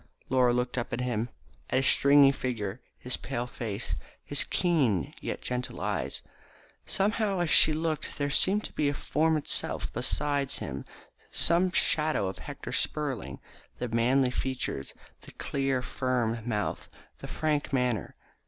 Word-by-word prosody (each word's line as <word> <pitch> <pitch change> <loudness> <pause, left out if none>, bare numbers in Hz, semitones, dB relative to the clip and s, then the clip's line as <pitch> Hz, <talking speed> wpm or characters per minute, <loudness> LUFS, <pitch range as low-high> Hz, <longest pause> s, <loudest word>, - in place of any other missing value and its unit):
Laura 125 -1 +4
looked 125 +1 0
up 120 - -4
at 120 - -1
him, 120 -2 -1 0.4
at - - 0
his 135 - +3
stringy 140 0 +6
figure, 120 -5 -3 0.2
his 125 - -2
pale 120 +1 -3
face, 115 -5 -4 0.3
his - - +1
keen, 140 - +1
yet - - -4
gentle 125 0 -3
eyes. - - -2 0.6
Somehow 205 0 +1
as 175 -3 +1
she 155 - +7
looked 155 0 -2
there 145 -1 -1
seemed 200 +8 +3
to 145 -1 0
form 155 +3 +1
itself 150 - -1
beside 140 +3 0
him 70 -1 -4 0.4
some 180 +2 +3
shadow 155 - +2
of 95 - -5
Hector - - -7
Spurling, 130 - -2 0.4
the 125 - -3
manly 125 +3 +3
features, 130 - -3 0.3
the - - -13
clear, 135 -2 -1
firm 125 -3 0
mouth, 105 -2 -2 0.3
the - - -7
frank 150 -2 -1
manner. 125 - 0
130 Hz, 140 wpm, -29 LUFS, 120-150 Hz, 0.6 s, she